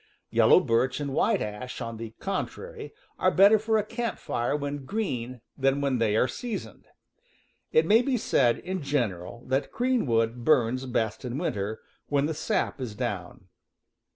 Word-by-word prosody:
Yellow - - +6
birch 125 +4 +1
and 140 -2 -3
white - - +2
ash, 105 +4 -6
on 115 -2 -5
the 115 0 -8
contrary, 435 - -5 0.3
are - - +4
better 200 +3 +6
for 220 +1 +1
a 210 - 0
camp 230 -1 -3
fire 120 +4 -1
when 145 -1 -3
green 130 - -3
than 135 +1 +1
when 140 -3 0
they 110 -2 +2
are 120 - +3
seasoned. 225 - -6 0.8
It 470 - +4
may 225 +3 +5
be 255 0 0
said, 125 - +2
in 185 0 -4
general, 120 -6 -2
that 135 +2 -1
green 250 - +1
wood 115 +1 +1
burns 130 -2 +2
best 110 -1 -1
in 125 0 -4
winter, 110 - -2 0.3
when 145 -1 +1
the 160 - -1
sap 185 -2 -1
is 115 -5 -5
down. - - -5
135 Hz, 165 wpm, -27 LUFS, 115-195 Hz, 0.8 s, Yellow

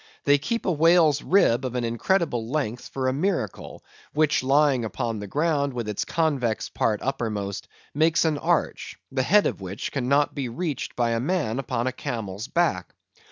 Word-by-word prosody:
They 145 0 +4
keep 230 +11 -2
a 185 - +2
Whale's 160 -2 +4
Rib 135 -10 +3
of 125 -1 -3
an 125 - -1
incredible 120 - 0
length 125 -5 -2
for 130 -1 -3
a 130 - +1
Miracle, 155 - -3 0.3
which 150 -1 +2
lying 135 -1 +3
upon 115 0 -3
the 105 - -6
Ground 145 - 0
with 120 -3 -3
its 105 -2 -2
convex 140 -9 0
part 105 -2 -1
uppermost, 105 -7 -3 0.3
makes 160 +2 +3
an 155 -2 +1
Arch, - - -1
the 130 -1 0
Head 205 +10 +4
of - - -2
which 95 +1 -5
cannot 140 +2 +1
be 135 -4 -3
reached 155 +3 -4
by 120 -1 +1
a 115 - 0
Man 140 -4 -1
upon 125 -2 -2
a 130 - 0
Camel's 110 -4 -5
Back. 160 - 0
135 Hz, 175 wpm, -25 LUFS, 115-155 Hz, 0.3 s, They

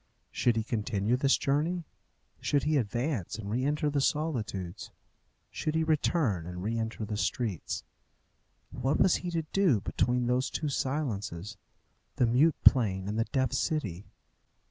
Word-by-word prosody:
Should 120 -2 +2
he 110 - 0
continue 110 0 0
this 135 +2 +3
journey? 160 +6 0 0.6
Should 145 -2 +1
he 155 +1 +1
advance 120 - -1
and 105 -2 -6
re 125 +4 0
enter 150 +2 +1
the 140 -1 +1
solitudes? 115 - -2 0.6
Should 155 - -2
he 160 - +2
return 150 - +1
and 90 0 -6
re 110 +3 -1
enter 110 -1 -3
the 105 0 -3
streets? 105 -5 -2 0.9
What 130 +3 0
was 185 - +5
he 180 - -5
to 165 -2 -1
do 185 - +4
between 125 +5 0
those 125 +2 +1
two 150 - -2
silences 115 - -2 0.6
the 125 - +3
mute 135 +7 +4
plain 95 -7 +4
and 105 +2 -2
the 115 - +2
deaf 130 0 0
city? 110 - -2
125 Hz, 150 wpm, -30 LUFS, 105-150 Hz, 0.9 s, was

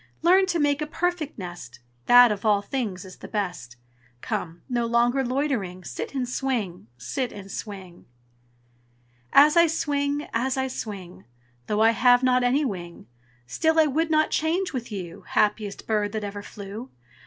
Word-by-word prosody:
Learn 375 +3 +5
to 350 -2 0
make 290 -1 +1
a 300 - -2
perfect 330 -1 -2
nest, 175 - -8 0.3
That 245 -1 +8
of 205 - -3
all 205 -2 +3
things 205 -8 -3
is 185 - -12
the - - -10
best. 180 - -4 0.5
Come! 170 +1 -4
nor 240 -2 0
longer 240 +3 +2
loitering 245 -9 -2
Sit 280 - -6
and 255 -2 -1
swing, 240 - -3
sit 250 - -3
and 195 -1 -10
swing!" 190 -5 -8 1.2
As 300 +3 +7
I 340 0 +6
swing, 290 -2 -1
as 255 +3 0
I 265 0 0
swing, 190 - -7 0.4
Though 210 +1 0
I 225 - +6
have 245 +1 +4
not 255 -1 +3
any 265 +5 +2
wing, 175 -7 -6 0.4
Still 320 - +1
I 315 - +6
would 310 +3 0
not 310 0 +2
change 335 +3 0
with 240 -3 -5
you, 180 -3 -6
Happiest 210 -1 0
bird 210 -1 0
that 215 -1 -3
ever 205 0 -5
flew. 205 +5 -9
240 Hz, 165 wpm, -25 LUFS, 200-285 Hz, 1.2 s, That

